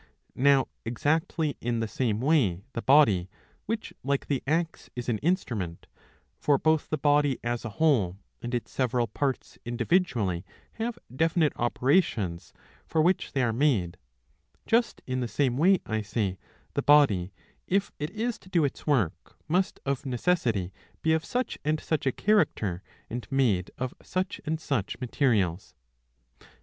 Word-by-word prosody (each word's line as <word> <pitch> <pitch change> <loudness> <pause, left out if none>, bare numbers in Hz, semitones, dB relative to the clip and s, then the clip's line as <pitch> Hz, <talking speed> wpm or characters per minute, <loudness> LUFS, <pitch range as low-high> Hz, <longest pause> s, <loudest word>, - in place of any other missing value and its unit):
Now 135 0 +4 0.2
exactly 155 +5 0
in 120 0 -1
the 115 - -1
same 110 -1 -1
way 125 - +2
the 115 - -3
body, 110 -11 +5 0.4
which 220 +1 -3
like 140 0 0
the 140 -3 -1
axe 165 +2 -1
is 125 0 -4
an 110 -3 0
instrument 120 - -1 0.3
— - - -38
for 145 -2 +4
both 155 0 +1
the 155 - 0
body 145 -2 +3
as 120 0 -2
a 120 - -4
whole 115 - +3 0.2
and 120 +1 -3
its 120 - -4
several 125 -2 +1
parts 135 +5 -3
individually 120 - 0 0.4
have 235 +1 -2 0.2
definite 160 0 +2
opera 130 +8 +3
tions 90 - -5 0.4
for 160 - 0
which 175 +4 +2
they 135 - +1
are 115 -2 +1
made 110 - +1 0.4
— 80 0 -38
^just 230 +1 +2
in 130 0 -2
the 125 - -1
same 120 +3 +1
way, 180 +7 +4
I 110 0 -1
say, 100 -3 -2 0.3
the - - 0
body, 110 -12 +4 0.4
if 195 +1 +1
it 150 +1 -2
is 220 +4 -3
to 185 - -17
do 170 -5 +3
its 140 - -5
work, 120 - 0
must 180 +4 +1
of 140 -1 -1
necessity 120 - 0 0.3
be 160 - +3
of 160 0 +1
such 250 +7 -2
and 155 +1 +1
such 155 -4 -1
a - - +4
character, 110 - +1 0.3
and 120 +1 -5
made 115 -10 +2
of 130 -1 -3
such 185 0 -3
and 155 +1 -1
such 130 -10 -2
materials. 110 - 0
135 Hz, 160 wpm, -28 LUFS, 110-160 Hz, 0.4 s, body